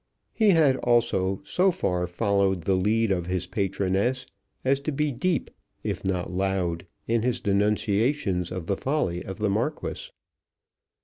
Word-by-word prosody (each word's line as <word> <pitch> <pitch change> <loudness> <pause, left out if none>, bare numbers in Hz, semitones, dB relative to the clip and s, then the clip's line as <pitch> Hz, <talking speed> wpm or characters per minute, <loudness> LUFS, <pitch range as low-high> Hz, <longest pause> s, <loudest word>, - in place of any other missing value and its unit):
He 220 -2 +3
had 155 -8 +5
also 115 -7 +1
so 185 +5 +2
far 90 - -1
followed 100 0 +1
the 95 - +2
lead 105 +4 +2
of 90 -2 -1
his 90 0 -1
patroness 100 +6 0 0.4
as 135 +1 +3
to 145 +2 -3
be 150 +1 0
deep 155 +3 -1 0.3
if - - -3
not 90 -2 -1
loud 90 -2 -1 0.2
in 115 0 +2
his 125 0 0
denunciations 100 - +1
of 90 -2 -4
the 100 +3 -1
folly 130 - -1
of 95 0 -7
the 105 -1 0
Marquis. 150 - -2
100 Hz, 145 wpm, -26 LUFS, 95-130 Hz, 0.4 s, had